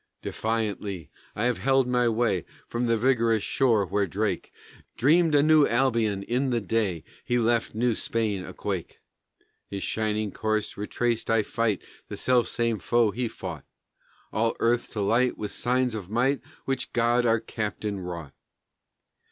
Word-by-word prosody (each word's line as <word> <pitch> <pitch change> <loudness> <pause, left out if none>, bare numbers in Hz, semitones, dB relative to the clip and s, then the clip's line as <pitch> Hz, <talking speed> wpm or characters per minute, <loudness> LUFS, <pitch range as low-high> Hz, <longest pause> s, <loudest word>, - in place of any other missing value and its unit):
Defiantly 105 -7 -2 0.2
I 105 - -1
have 125 -1 +1
held 135 -1 +3
my 125 -1 +2
way 110 -6 +1 0.2
From 120 +1 -1
the 115 0 +2
vigorous 115 -3 +2
shore 115 -7 +2
where 100 +1 0
Drake 105 +4 -2 0.5
Dreamed 155 +5 +4
a 145 - +5
New 155 -1 +6
Albion 115 -5 +1
in 125 +5 0
the 120 -2 +1
day 100 -6 -1 0.2
He 120 - 0
left 115 -1 +1
New 120 +1 +2
Spain 110 -4 -1
a - - -8
quake; - - -4 0.7
His 100 -1 -5
shining 110 -1 -1
course 110 -1 -1
retraced, 115 +3 -1
I 115 -1 +3
fight 115 -1 -1 0.2
The - - -6
self 125 -2 +3
same 115 -2 0
foe 120 -1 +2
he 120 +3 -2
fought, - - -7 0.7
All 115 +1 +1
earth 120 +1 +1
to 105 - -2
light 115 +5 +2
with 105 -1 -4
signs 125 0 +1
of 100 -4 -6
might 125 +5 +1 0.2
Which 135 -1 -2
God 120 +1 +2
our 115 0 +3
Captain 105 -2 -4
wrought. 85 -6 -6
115 Hz, 155 wpm, -26 LUFS, 105-120 Hz, 0.7 s, New